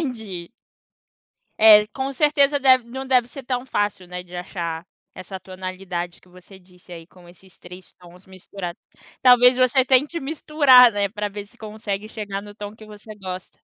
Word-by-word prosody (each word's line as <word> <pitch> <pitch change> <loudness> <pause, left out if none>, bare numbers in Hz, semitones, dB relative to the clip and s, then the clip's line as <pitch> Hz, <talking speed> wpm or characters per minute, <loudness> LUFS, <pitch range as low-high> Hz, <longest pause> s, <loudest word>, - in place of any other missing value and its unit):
entendi. 185 -6 -9 1.1
É, 210 -1 +8
com 265 +4 -4
certeza 285 0 +2
deve 255 -3 +4
não 265 +2 -6
deve 250 -2 +2
ser 275 +1 -10
tão 250 0 -3
fácil, 205 -7 -2
né, 180 0 -7
de 180 0 -13
achar 170 -2 -5 0.3
essa 190 +1 -9
tonalidade 185 -2 -7
que 185 - -24
você 185 +2 -16
disse 180 -1 -21
aí, 165 -1 -10
com 180 0 -19
esses 185 +2 -19
3 180 +1 -13
tons 180 +1 -17
misturados. 185 -1 -9 0.4
Talvez 250 0 +6
você 255 +1 +3
tente 280 +6 +1
misturar, 275 -4 +5
né, 205 -1 -1
pra 210 +1 -4
ver 205 0 -8
se 235 +4 -23
consegue 210 -2 -6
chegar 205 -3 -6
no 205 0 -13
tom 210 0 -8
que 220 - -14
você 215 +1 -12
gosta. 185 -2 -9
205 Hz, 170 wpm, -22 LUFS, 185-250 Hz, 1.1 s, É